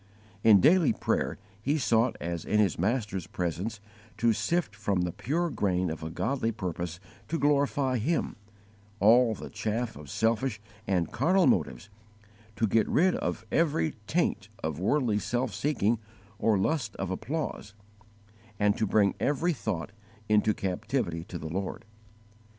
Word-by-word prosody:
In 105 -3 +8
daily 165 +1 +5
prayer - - -1 0.2
he 145 +7 +1
sought 120 -3 +2
as 85 -1 -4
in 105 - +1
his 100 -6 +2
Master's 100 -3 -1
presence 90 +5 -3 0.4
to 115 +1 +3
sift 105 - -1
from 100 -3 0
the 90 0 -1
pure 165 - -1
grain 90 -7 0
of 80 -1 -6
a 80 - -4
godly 115 +6 -1
purpose 90 -4 -4 0.3
to 165 - -1
glorify 140 -3 +2
Him, 155 +7 -1 0.6
all 115 +2 +5
the - - -9
chaff 115 +2 -2
of 75 -1 -11
selfish 115 - 0 0.3
and 90 -4 0
carnal 185 +1 +3
motives, 75 - 0 0.6
to 110 - +1
get 110 +1 +2
rid 185 +3 +4
of - - -3
every 145 - +1
taint - - 0
of 80 -1 -2
worldly 110 +1 +1
self 120 0 -1
seeking 115 -2 +1 0.4
or 110 -2 +3
lust 115 +1 -1
of 95 -1 -3
applause, 110 -2 -4 0.8
and 105 0 +3
to 110 - +1
bring 100 0 +3
every 165 +5 +1
thought 100 - -3 0.4
into 105 0 +3
captivity 95 -2 -2
to 90 - -6
the 80 - -6
Lord. 95 +4 -4
110 Hz, 145 wpm, -28 LUFS, 95-130 Hz, 0.8 s, In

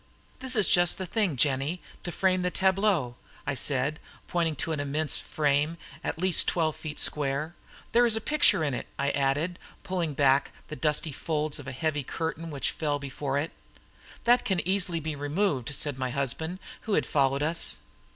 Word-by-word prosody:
"This 260 0 +2
is 210 -3 +4
just 175 0 +4
the 190 - -3
thing, 190 -4 0
Jennie, 140 +6 +1 0.2
to 175 - -4
frame 185 +1 +1
the 180 - +1
tableaux," 190 - +1 0.3
I 145 - -1
said, 140 +2 0 0.3
pointing 165 -3 0
to 165 - -3
an 155 - -1
immense 145 +2 -1
frame, 150 +2 0 0.3
at - - -2
least 185 +1 +4
twelve 160 -3 +1
feet 155 -1 -7
square. 145 +2 +1 0.4
"There 240 +1 +5
is 225 - +6
a - - +1
picture 290 - +3
in 145 -3 0
it," 125 - -4
I 140 0 +1
added, 145 +6 0 0.2
pulling 170 -5 -2
back 135 0 +3 0.2
the 155 - -5
dusty 150 +3 0
folds 150 0 -1
of 140 - -9
a - - -4
heavy 150 +2 -1
curtain 165 +4 -4
which 140 -3 -2
fell 150 -2 -1
before 140 0 -3
it. 150 +3 -1 0.7
"That 240 +1 +4
can 190 - 0
be 180 +2 0
easily 170 -6 -1
removed," 145 - -1
said 145 -2 -1
my 130 -1 -1
husband, 140 +6 -2 0.3
who 215 - -1
had - - +2
followed 140 0 +2
us. 165 +2 +1
155 Hz, 180 wpm, -28 LUFS, 140-175 Hz, 0.7 s, is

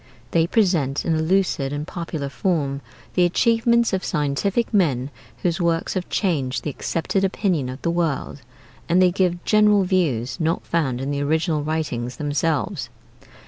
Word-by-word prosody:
They 165 -1 +3
present 170 - +1
in 165 - +1
a 155 - +1
lucid 160 -5 +1
and 145 +1 -3
popular 165 -4 -5
form 140 -2 -1 0.3
the 180 - +3
achievements 230 +5 +3
of 190 - 0
scientific 175 +10 -1
men 145 - +1 0.3
whose 175 +1 0
works 165 -1 0
have 185 -2 -3
changed 140 - -1
the 150 - -2
accepted 170 +7 -2
opinion 185 - 0
of 130 +2 -8
the 170 - +1
world, 160 -4 -2 0.5
and 175 +2 +4
they 185 -1 +5
give 175 -2 0
general 210 -2 +4
views 165 -9 0
not 165 +1 0
found 135 -7 -1
in 135 +2 -2
the 140 0 -1
original 155 +1 +1
writings 145 -6 -3
themselves. 145 -3 -1
165 Hz, 155 wpm, -22 LUFS, 140-185 Hz, 0.5 s, they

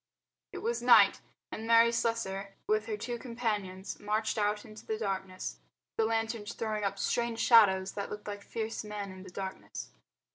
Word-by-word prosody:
It - - -7
was 470 +2 0
night, - - +7 0.3
and 220 +1 -5
Mary 230 0 +7
Slessor 200 -4 -1
with 215 +1 +1
her 215 -2 -2
two 240 +3 -4
companions 210 -6 -3
marched 215 +2 0
out 210 0 0
into 215 0 -11
the 220 - -2
darkness, 190 -3 -3 0.4
the 225 - +2
lanterns 225 -1 -1
throwing 215 -2 -2
up 200 0 -1
strange 235 +3 0
shadows 195 -6 +6
that 200 - -4
looked 210 0 -7
like 205 -1 -5
fierce 225 +2 -4
men 210 -2 -5
in 185 0 -10
the 185 - -10
darkness. 190 +1 -6
215 Hz, 170 wpm, -31 LUFS, 195-225 Hz, 0.4 s, night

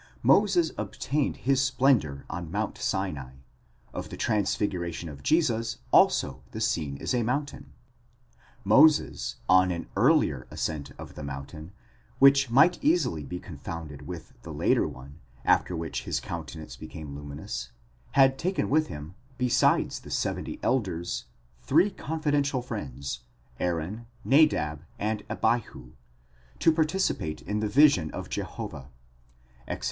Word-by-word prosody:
Moses 185 -6 +4
obtained 145 0 -1
his 135 0 +3
splendour 125 - +2
on 85 -1 -5
Mount 105 +4 -2
Sinai: 85 -10 -2 0.6
of - - -5
the - - -8
transfiguration 90 -5 -1
of 70 -2 -10
Jesus 115 - +1
also - - +4
the - - -7
scene 70 -4 -1
is 70 - -2
a 125 - +2
mountain; 140 +5 -3 0.9
Moses, 155 -1 +4
on 95 0 +5
an 85 -2 -3
earlier 110 - +3
ascent 75 -3 -3
of - - -9
the - - -9
mountain, 70 +4 -7 0.5
which 140 -1 +6
might 155 +9 +4
easily 130 - +2
be 90 +5 -5
confounded 75 -4 -8
with 85 -2 -8
the - - -9
later - - +2
one, 70 +5 -11 0.3
after 90 - +3
which 80 0 -4
his - - -1
coun 85 -2 -6
tenance 80 -2 -9
became 75 -3 -8
luminous, 70 -4 -6 0.4
had 135 -1 +5
taken 185 -3 -1
with 155 +1 +3
him, 75 - -8 0.2
besides 125 -1 +2
the - - -13
seventy - - -2
elders, 95 -9 -1 0.4
three 170 +9 +3
confidential 145 -6 -1
friends, 70 - -5 0.4
Aaron, 90 +7 -2 0.2
Nadab, 130 - +3 0.2
and 105 0 -1
Abihu, 70 - -1 0.7
to 165 - +4
participate 155 - 0
in 105 +1 -2
the 105 0 -1
vision 135 - +5
of - - -7
Jehovah 65 0 -5 0.8
(Exod. - - -4
100 Hz, 130 wpm, -27 LUFS, -, 0.9 s, which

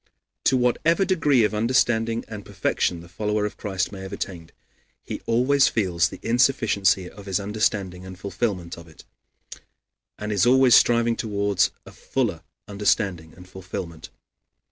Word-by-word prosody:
To 130 - +4
whatever 155 +9 +2
degree 150 - +3
of 105 - +1
understanding 115 0 +1
and 105 -2 -8
perfection 85 -2 -1
the 85 - -13
follower 105 +3 -1
of 105 - -5
Christ 95 -2 -3
may 100 -2 -8
have 95 +1 -8
attained, 90 -5 -6 0.5
he - - -6
always 130 +4 +3
feels 90 -6 +1
the - - -10
insufficiency 115 -6 +2
of 100 +2 -13
his 95 -1 0
understanding 100 -3 -1
and 95 -1 -10
fulfillment 95 -3 -3
of 85 - -13
it, 80 - -16 1.1
and 105 0 -4
is 105 +3 +2
always 130 -1 +5
striving 115 -1 +4
toward 100 -4 0 0.2
a - - -12
fuller 115 -11 -2 0.3
understanding 100 -5 -1
and 90 0 -14
fulfillment. 90 -3 -8
105 Hz, 145 wpm, -24 LUFS, 95-120 Hz, 1.1 s, always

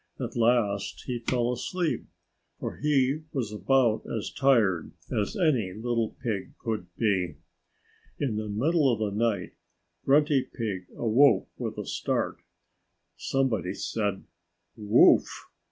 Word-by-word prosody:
At - - -4
last 115 -4 +1
he 125 -2 -3
fell 120 +1 0
asleep, 165 +7 -2 0.5
for - - -5
he 140 0 +2
was 120 -7 -2
about 110 +2 +2
as 110 -3 -3
tired 115 -10 +2 0.2
as 105 -1 -1
any 135 - +2
little 115 +1 -2
pig 110 -6 -3
could 110 -6 -3
be. 95 -7 0 0.8
In 130 -7 -1
the 110 0 -3
middle 140 +7 +2
of 115 - 0
the 105 -1 -1
night 105 -5 0 0.5
Grunty 145 0 +4
Pig 105 -8 -5
awoke 120 -1 +4
with - - -4
a - - -4
start. - - -2 0.8
Somebody 115 -9 -1
said 100 -3 -2 0.5
"Woof!" 105 -2 +4
115 Hz, 120 wpm, -27 LUFS, 105-135 Hz, 0.8 s, Grunty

